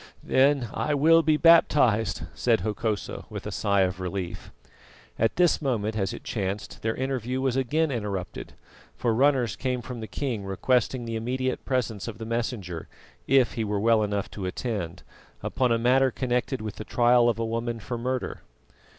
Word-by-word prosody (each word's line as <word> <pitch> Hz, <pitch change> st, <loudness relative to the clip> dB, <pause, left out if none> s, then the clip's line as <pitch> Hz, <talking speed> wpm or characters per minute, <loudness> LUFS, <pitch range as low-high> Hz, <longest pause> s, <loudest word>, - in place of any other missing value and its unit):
"Then 135 Hz, -1 st, +3 dB
I 150 Hz, -, 0 dB
will 165 Hz, +3 st, +6 dB
be 155 Hz, -1 st, +3 dB
baptised," 125 Hz, -, +4 dB
said 115 Hz, -2 st, +2 dB
Hokosa 110 Hz, -1 st, -3 dB
with -, -, -7 dB
a -, -, -4 dB
sigh 100 Hz, -1 st, +1 dB
of 90 Hz, 0 st, 0 dB
relief. 90 Hz, -1 st, -5 dB, 0.7 s
At 115 Hz, 0 st, +2 dB
this 175 Hz, -3 st, +3 dB
moment, 110 Hz, -6 st, -1 dB
as 100 Hz, -1 st, -1 dB
it 120 Hz, -, -8 dB
chanced, 100 Hz, -1 st, -4 dB
their 110 Hz, 0 st, -1 dB
interview 130 Hz, -1 st, -2 dB
was 130 Hz, -2 st, 0 dB
again 145 Hz, +4 st, +1 dB
interrupted, 100 Hz, -7 st, -4 dB, 0.4 s
for 120 Hz, -2 st, 0 dB
runners 130 Hz, -2 st, +2 dB
came 130 Hz, -2 st, -2 dB
from 125 Hz, 0 st, -7 dB
the 110 Hz, -, -6 dB
king 120 Hz, -7 st, -3 dB
requesting 120 Hz, +5 st, 0 dB
the 115 Hz, 0 st, -4 dB
immediate 130 Hz, +3 st, -2 dB
presence 120 Hz, -6 st, -1 dB
of 115 Hz, -, -6 dB
the 110 Hz, -, -6 dB
Messenger, 110 Hz, -7 st, -3 dB, 0.4 s
if 135 Hz, -3 st, +4 dB
he 115 Hz, -, -2 dB
were 105 Hz, -1 st, -1 dB
well 115 Hz, +1 st, +4 dB
enough 100 Hz, -1 st, -2 dB
to 95 Hz, -3 st, -5 dB
attend, 90 Hz, -4 st, -4 dB, 0.4 s
upon 125 Hz, -2 st, 0 dB
a 115 Hz, -, +3 dB
matter 130 Hz, +3 st, +4 dB
connected 125 Hz, 0 st, -1 dB
with 110 Hz, -2 st, -6 dB
the -, -, -5 dB
trial 120 Hz, +1 st, +4 dB
of 115 Hz, -, 0 dB
a 115 Hz, -, -1 dB
woman 115 Hz, +1 st, -2 dB
for 120 Hz, +2 st, -5 dB
murder. 130 Hz, +1 st, -3 dB
115 Hz, 175 wpm, -26 LUFS, 105-130 Hz, 0.7 s, will